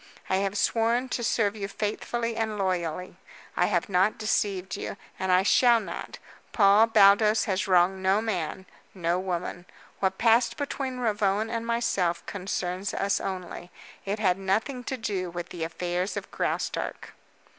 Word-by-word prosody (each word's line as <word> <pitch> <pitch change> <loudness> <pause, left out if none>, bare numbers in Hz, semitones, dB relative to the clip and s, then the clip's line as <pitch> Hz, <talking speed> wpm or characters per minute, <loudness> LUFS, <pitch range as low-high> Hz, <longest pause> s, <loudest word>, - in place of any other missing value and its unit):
I 190 - +3
have 195 +1 -1
sworn 235 +4 +1
to 240 - -2
serve 220 -2 +1
you 200 -2 -4
faithfully 230 +3 -3
and 220 -2 -2
loyally. 180 -2 -2 0.4
I 180 - +3
have 175 -4 0
not 190 +2 +2
deceived 195 -3 -1
you, - - -5 0.2
and 190 0 0
I 185 +1 +5
shall 240 +3 +5
not. - - -7 0.4
Paul 205 +1 +6
Baldos 215 0 +5
has 190 -1 -1
wronged 185 +1 +3
no 190 +2 +3
man, 190 -4 -3 0.3
no 175 -1 0
woman. 180 -1 -4 0.3
What 190 -1 0
passed 230 +1 +3
between 275 -3 -3
Ravone 215 -2 0
and 230 0 -3
myself 200 -7 0
concerns 185 0 -3
us 200 0 0
only. 185 -2 -5 0.3
It 200 +2 -2
had 190 -3 +1
nothing 220 +7 -1
to 265 - -3
do 200 -6 -3
with 175 0 -6
the 170 - -5
affairs 175 +3 -2
of - - -6
Graustark." - - -3
195 Hz, 155 wpm, -27 LUFS, 185-225 Hz, 0.4 s, Paul